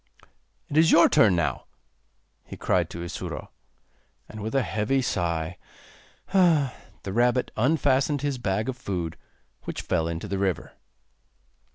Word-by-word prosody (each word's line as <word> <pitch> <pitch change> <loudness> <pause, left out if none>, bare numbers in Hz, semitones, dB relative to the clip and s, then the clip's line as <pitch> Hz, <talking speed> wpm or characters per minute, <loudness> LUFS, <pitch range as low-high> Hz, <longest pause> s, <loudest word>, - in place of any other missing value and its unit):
'It 145 - -3
is 160 +1 +6
your 170 - +7
turn 100 -5 +4
now,' 85 -3 -1 0.8
he - - -10
cried - - +1
to 85 - -6
Isuro. 85 - -6 0.8
And 110 - -9
with 110 +5 -4
a 135 - +3
heavy 110 +5 0
sigh, 85 -5 -2 0.7
the 165 -8 +4 0.3
rabbit 120 +5 +1
unfastened 140 +2 +2
his 140 -3 -1
bag 105 -1 -1
of 130 - -2
food, 90 -9 -4 0.5
which - - -5
fell 80 -2 0
into 85 +4 -4
the 100 -1 -2
river. 95 -4 -1
110 Hz, 135 wpm, -26 LUFS, 90-135 Hz, 0.8 s, your